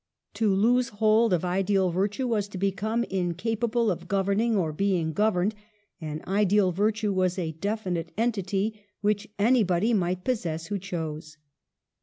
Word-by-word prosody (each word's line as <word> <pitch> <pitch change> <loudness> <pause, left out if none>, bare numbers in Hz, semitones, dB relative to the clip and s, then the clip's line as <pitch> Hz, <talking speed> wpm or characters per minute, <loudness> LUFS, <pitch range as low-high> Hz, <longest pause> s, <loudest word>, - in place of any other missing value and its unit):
To 220 -3 +1
lose 240 +6 +3
hold 220 +2 +3
of 180 -1 +1
ideal 190 0 +1
virtue 205 +8 -1
was 210 -4 0
to 200 - -8
become 200 +5 0
incapable 220 +5 -1
of 175 - -5
governing 200 +3 +1
or 160 -5 0
being 175 -2 0
governed; 210 0 +1 0.5
and 155 0 -5
ideal 200 0 +3
virtue 210 +2 0
was 185 -1 +1
a 165 -3 -2
definite 180 -1 -3
entity 210 -2 -1 0.2
which 210 +1 0
anybody 215 -2 +3
might 180 -2 0
possess 170 -10 -2
who 200 +2 -3
chose. 160 -4 -5
200 Hz, 140 wpm, -26 LUFS, 180-215 Hz, 0.5 s, lose